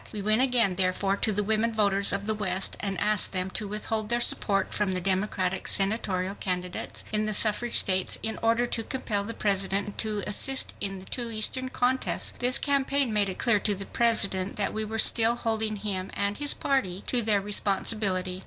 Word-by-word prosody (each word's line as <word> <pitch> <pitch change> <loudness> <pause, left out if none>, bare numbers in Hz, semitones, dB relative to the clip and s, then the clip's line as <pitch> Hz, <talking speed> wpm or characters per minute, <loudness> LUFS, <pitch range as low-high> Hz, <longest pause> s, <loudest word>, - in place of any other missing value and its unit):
We 215 - -6
went 215 +3 +2
again, 235 -8 +3
therefore, 190 +1 +1
to 215 - 0
the 210 0 0
women 220 +2 +1
voters 200 -2 +2
of 200 - -2
the 220 - +1
west 195 -3 0
and 195 -3 -3
asked 210 -2 +1
them 185 0 -2
to 210 - -1
withhold 215 +1 -3
their 240 0 +1
support 195 -4 +1
from 205 -2 -1
the - - 0
Democratic 190 0 -1
Senatorial 195 -2 +1
candidates 180 -2 -4
in 215 0 0
the 215 - 0
suffrage 230 +3 +2
states 185 -1 +1
in 220 0 -3
order 230 +1 +2
to 235 - -2
compel 215 -5 -2
the 230 +3 -6
President 200 0 -1
to 215 -2 -2
assist 265 +6 +1
in 195 -1 -3
the 185 - -11
two 240 +2 -4
Eastern 245 +4 0
contests. 255 +1 +1
This 250 +1 +4
campaign 280 -3 +1
made 205 -2 +2
it 185 - -6
clear 235 -4 +2
to 205 0 0
the 195 +1 -6
President 200 -5 0
that 205 - -2
we 215 - -2
were 220 +1 -5
still 225 +1 +5
holding 220 -2 -1
him 195 -2 -3
and 200 0 +1
his 290 -1 +1
party 195 -9 -1
to 245 - 0
their 210 -2 +2
responsibility. 195 -2 -1
210 Hz, 195 wpm, -27 LUFS, 195-225 Hz, -, still